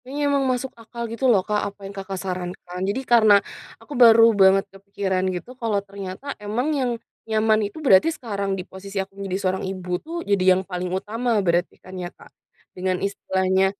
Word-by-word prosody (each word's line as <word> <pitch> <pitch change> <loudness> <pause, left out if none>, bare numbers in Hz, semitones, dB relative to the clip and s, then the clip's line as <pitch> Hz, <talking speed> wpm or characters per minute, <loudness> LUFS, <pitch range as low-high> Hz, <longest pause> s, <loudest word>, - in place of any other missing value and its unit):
Iya 280 +3 -5
emang 280 -1 +2
masuk 255 +1 -2
akal 235 +1 -7
gitu 250 +3 -2
loh 200 -5 +4
Kak 210 -1 +1
apa 200 - -20
yang 195 - -7
Kakak 195 0 -5
sarankan 180 -1 -5
jadi 220 +6 -1
karena, 220 -3 +7 0.5
aku 295 - -10
baru 225 -1 +8 0.2
banget 190 +1 +6
kepikiran 195 -1 -2
gitu 180 - -7
kalau 225 -3 +1
ternyata 195 +4 -8 0.2
emang 230 +7 -1
yang 250 -2 0 0.4
nyaman 220 0 +3
itu 205 - -15
berarti 195 +6 +6
sekarang 200 -6 -3
di 180 - -4
posisi 195 +1 -9
aku 195 - -19
menjadi 195 -2 -3
seorang 190 0 0
ibu 185 -1 -7
tuh 330 +2 -6
jadi 200 -2 +3
yang - - -1
paling 180 -1 -3
utama 225 +5 -3 0.2
berarti 175 +1 +1
kan 185 - -12
ya 175 - -4
Kak. - - -16 0.5
Dengan 185 0 -1
istilahnya, 190 -1 +1
200 Hz, 185 wpm, -23 LUFS, 185-225 Hz, 0.5 s, baru